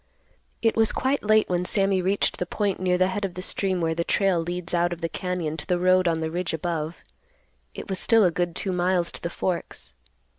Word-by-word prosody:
It 225 - +3
was 225 -1 +3
quite 270 +2 0
late 215 0 +3
when 180 -1 0
Sammy 195 0 +2
reached 195 +3 +1
the 180 - -2
point 200 +1 -1
near 180 -1 +1
the 185 +1 +2
head 205 +2 -3
of 185 -3 -3
the 180 - -5
stream 190 -2 0
where 165 -1 +1
the 170 +1 -1
trail 190 -1 +2
leads 175 +1 -4
out 175 0 +2
of 175 0 -5
the 165 - 0
cañon 180 -4 -3
to - - -7
the 180 - +1
road 185 0 +3
on 165 -1 0
the 160 0 -2
ridge 175 -1 -2
above. 160 0 -3 0.8
It - - -7
was 190 -1 -1
still 225 -3 +4
a 175 - +3
good 175 0 -2
two 195 - -2
miles 180 -1 +1
to - - -9
the 170 - -3
Forks. 170 - -4
180 Hz, 230 wpm, -25 LUFS, 170-190 Hz, 0.8 s, still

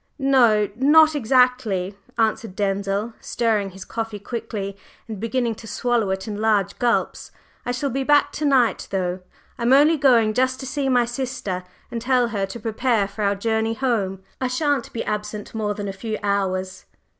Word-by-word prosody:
"No, 245 -7 +4
not 310 +4 +6
exactly," 250 -7 +2 0.2
answered 225 -2 0
Denzil, 200 +2 -1
stirring 220 -4 0
his 190 0 -10
coffee 225 -2 -4
quickly 205 -2 -5 0.3
and 220 -3 -6
beginning 230 +1 -1
to 225 +1 -11
swallow 235 -1 0
it 190 +1 -3
in 210 -1 -4
large 205 -3 +1
gulps. 240 -1 0 0.4
"I - - +1
shall 265 +3 -2
be 270 +2 -1
back 290 +1 +4
to 305 - -3
night, 260 -5 +2
though. 185 -1 -1 0.4
I'm 235 +2 +3
only 300 +4 +5
going 240 -6 +4
just 260 +2 +1
to - - -6
see 275 0 -1
my 245 -2 +3
sister 240 -7 -4 0.3
and 230 - -4
tell 250 -1 +2
her 200 -3 -2
to 215 +5 -8
prepare 225 -1 0
for 200 +2 -8
our 200 0 +2
journey 220 +2 0
home. 205 -7 -1 0.2
I 260 - +1
shan't 280 0 0
be 230 - -3
absent 210 0 -4
more 210 -2 -2
than 205 -1 -4
a 195 - -4
few 215 +2 -4
hours." 190 -2 -1
225 Hz, 175 wpm, -22 LUFS, 200-255 Hz, 0.4 s, not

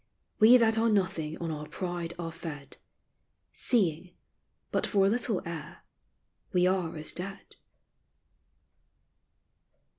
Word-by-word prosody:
We 230 +4 +8
that 225 -2 +3
are 230 +1 +3
nothing 185 -7 0
on 165 -1 -4
our 150 -1 -6
pride 175 -1 -4
are 165 -1 -5
fed, 150 -4 -8 0.8
Seeing, 180 -6 +1 0.6
but - - +1
for 195 -2 +3
a - - +4
little 230 -2 0
air, 165 -2 -7 0.7
we 180 -1 +3
are 180 -3 0
as 155 - -1
dead. 195 +3 -6
180 Hz, 115 wpm, -29 LUFS, 165-200 Hz, 0.8 s, We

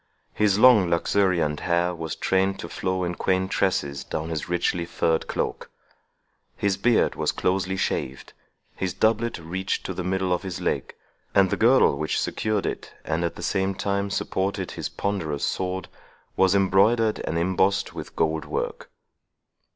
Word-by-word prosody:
His 105 -2 +2
long 110 -6 +6
luxuriant 85 -3 +1
hair 85 0 +1
was 80 -2 -5
trained 95 +1 +1
to - - -6
flow 95 0 -2
in 90 0 -1
quaint 95 +2 0
tresses 70 -8 0
down 80 +1 -4
his 80 +1 -4
richly 90 0 0
furred 85 -1 0
cloak. - - -3 0.9
His 100 -1 +1
beard 115 +4 +2
was - - 0
closely 95 0 -1
shaved, 65 -7 -3 0.4
his 95 -2 -3
doublet 115 +1 +1
reached 90 +3 -3
to - - -3
the 90 - -4
middle 95 0 0
of 90 - -1
his 95 -2 -5
leg, 90 - -2 0.4
and 95 -2 +5
the - - +2
girdle 115 - +4
which 75 - 0
secured 110 -2 -1
it, - - -4
and 80 +2 -1
at 85 - -2
the - - -8
same 95 0 0
time 100 +1 -1
supported 95 0 -2
his - - -4
ponderous 85 -8 -3
sword, 95 -1 -2 0.5
was 95 0 +4
embroidered 105 +4 +3
and 85 - -3
embossed 95 +3 +1
with - - -8
gold 80 0 0
work. - - -4
95 Hz, 160 wpm, -25 LUFS, 85-100 Hz, 0.9 s, long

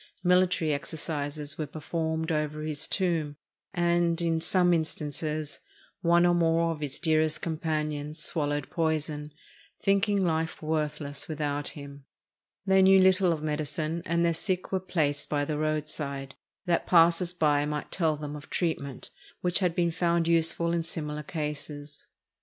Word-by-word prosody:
Military 180 -3 +3
exercises 145 -1 -4
were 155 - -2
performed 160 +2 -2
over 150 -1 -1
his 155 -1 -1
tomb, 165 -6 0 0.4
and, 175 -2 +2
in 165 -1 0
some 180 +1 +4
instances, 155 -1 -2 0.4
one 170 0 +4
or 175 - +4
more 165 -1 +2
of 160 - -5
his 145 -2 -3
dearest 155 -1 +1
companions 155 -2 -2
swallowed 145 -3 -1
poison, 155 -2 -1 0.5
thinking 200 0 +3
life 160 -1 -1
worthless 150 -2 -2
without 145 -2 -2
him. 140 -1 -10 0.6
They 190 -1 +5
knew 190 0 +7
little 185 -1 +5
of 155 -2 -2
medicine, 155 +2 -2
and 170 0 +2
their 170 - +3
sick 185 +2 -1
were 190 - +1
placed 155 -6 -1
by 145 -1 0
the 150 0 -2
roadside, 150 -3 -2 0.3
that 175 -2 +1
passers 170 0 +5
by 150 -5 +2
might 150 0 -4
tell 160 -4 +1
them 150 0 -6
of 145 - -10
treatment 140 -6 -3 0.3
which 180 +1 +2
had 180 -3 +1
been 170 -1 +2
found 170 -1 +1
useful 170 0 +2
in 170 - +1
similar 150 -2 -4
cases. 150 -1 -5
160 Hz, 145 wpm, -28 LUFS, 150-170 Hz, 0.6 s, knew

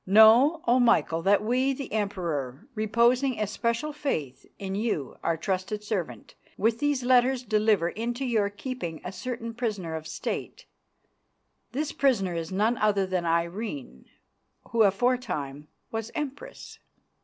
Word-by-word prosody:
"'Know, 230 - +7
O 245 +2 +4
Michael, 165 -9 +3
that 200 +4 +3
we, 255 +4 +2
the 265 -4 -7
Emperor, 175 - -2
reposing 235 +4 +2
especial 230 +7 -1
faith 155 - -3
in 190 -1 -5
you 200 - -2
our 165 -1 0
trusted 190 +4 -2
servant, 175 - -4 0.2
with 225 +2 +1
these 290 -3 +1
letters 250 +1 +3
deliver 210 -5 +2
into 240 +6 -3
your 220 -5 +1
keeping 205 - -5
a 180 - -5
certain 230 +2 -5
prisoner 210 -8 -3
of 160 0 -5
State. - - -5 1.1
This 295 +4 -2
prisoner 225 -10 +1
is 165 0 -4
none 215 +5 +1
other 205 -2 +2
than 185 -2 -1
Irene, 170 - -2 0.7
who 230 - +2
aforetime 195 - +1 0.2
was 225 0 -3
Empress. 300 - -6
215 Hz, 130 wpm, -27 LUFS, 180-245 Hz, 1.1 s, Know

